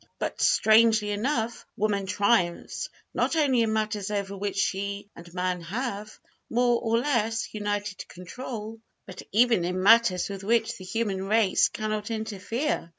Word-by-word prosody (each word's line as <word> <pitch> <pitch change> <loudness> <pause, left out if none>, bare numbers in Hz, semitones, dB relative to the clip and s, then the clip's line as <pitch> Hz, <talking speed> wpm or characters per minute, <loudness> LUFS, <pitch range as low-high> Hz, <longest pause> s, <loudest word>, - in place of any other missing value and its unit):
But, - - -4
strangely 220 -1 +4
enough, 225 +2 -1
woman 200 -2 0
triumphs, 200 -3 0 0.2
not - - 0
only 275 -6 +3
in 225 -1 +1
matters 215 -2 -1
over 200 -1 -3
which 200 +1 -3
she 200 +1 -2
and 170 0 -12
man 180 0 -2
have, 210 +3 -5 0.3
more 240 0 +2
or 230 -1 +1
less, 230 -4 0
united 205 -1 -3
control, 220 +4 -7 0.3
but 185 - -9
even 230 -3 +4
in 180 +1 -2
matters 215 -4 +5
with 195 -1 -7
which 225 +2 +1
the 185 - -9
human 195 -2 -2
race 215 -2 +3
cannot 215 0 -3
interfere. 220 - -3
210 Hz, 145 wpm, -26 LUFS, 195-230 Hz, 0.3 s, matters